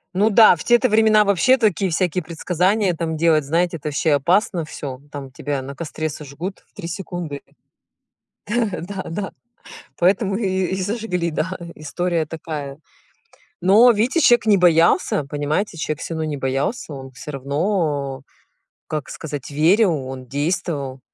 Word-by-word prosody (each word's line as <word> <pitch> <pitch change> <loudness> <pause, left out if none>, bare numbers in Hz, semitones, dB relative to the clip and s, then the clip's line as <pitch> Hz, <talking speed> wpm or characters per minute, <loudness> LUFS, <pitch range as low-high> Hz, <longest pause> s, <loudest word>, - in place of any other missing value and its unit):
Ну 205 +4 +3
да, 220 -3 +7
в 160 - -8
те 240 0 +5
то 255 - +2
времена 215 -1 +4
вообще 200 +7 +4
такие 200 -5 +1
всякие 180 +1 0
предсказания 180 +4 0
там 160 -1 -3
делать, 160 -1 +3
знаете, 170 +5 0
это 150 -1 -4
ваще 150 +2 +1
опасно 170 +5 +2
всё. 145 -3 -6
М, 140 +3 -21
там 140 -2 -7
тебя 140 +1 -4
на 140 +2 -8
костре 155 0 -4
сожгут 155 +6 -7
в - - -48
3 200 -5 -7
секунды. 175 -5 -5 1.1
Да-да, 200 -4 -3 0.7
поэтому 195 +2 +2
и 215 -1 -1 0.2
и 190 +2 -3
сожгли, 185 -4 -2
да, 175 +5 -2
ы 170 -1 -9
и - - -17
история 165 +2 -1
такая. 150 -3 -6 0.8
Но, 205 +7 +6
вдидите, 240 +9 +1
человек 240 -5 +5
не 215 -2 +5
боялся, 170 -3 +3
понимаете, 150 +7 -2
человек 155 -1 -3
всё 165 - -5
равно 160 -1 -2
не 155 -2 -3
боялся 135 - -2
он 135 -1 -9
всё 150 +4 -9
равно 140 -1 -1 0.7
как 155 -2 -4
сказать, 145 -4 -6
верил, 175 +7 +4
он 130 -1 -8
действовал. 145 -2 -2
170 Hz, 155 wpm, -21 LUFS, 145-195 Hz, 1.1 s, да